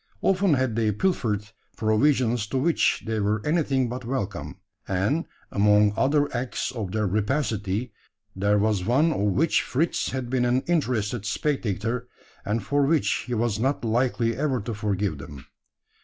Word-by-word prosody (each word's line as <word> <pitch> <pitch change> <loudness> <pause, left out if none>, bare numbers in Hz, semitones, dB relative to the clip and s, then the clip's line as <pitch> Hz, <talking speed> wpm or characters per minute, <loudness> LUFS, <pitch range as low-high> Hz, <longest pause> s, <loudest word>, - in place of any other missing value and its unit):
Often 190 -4 +3
had 130 -4 0
they 110 -2 +2
pilfered 105 - 0 0.3
provisions 115 0 +2
to 120 - -2
which 165 +5 +2
they 110 -1 -1
were 105 +1 +1
anything 140 -5 +1
but 125 +2 -5
welcome; 100 - -4 0.3
and, 105 - 0 0.3
among 105 0 +4
other 145 +4 +2
acts 120 +1 -2
of 110 -7 -5
their 110 +1 0
rapacity, 105 0 -1 0.4
there 100 +2 +2
was 105 -2 +1
one 135 - +3
of - - -3
which 105 - +2
Fritz 160 +7 -1
had 130 -2 -3
been 125 0 0
an 125 +1 +2
interested 125 - -1
spectator, 115 -1 -1 0.4
and 105 +1 -1
for 145 +7 +1
which 150 +1 +1
he 125 - -2
was 110 -2 0
not 130 +1 0
likely 115 0 +1
ever 135 -2 0
to 115 +3 -4
forgive 100 -6 -2
them. 70 -1 -10
115 Hz, 155 wpm, -25 LUFS, 105-135 Hz, 0.4 s, among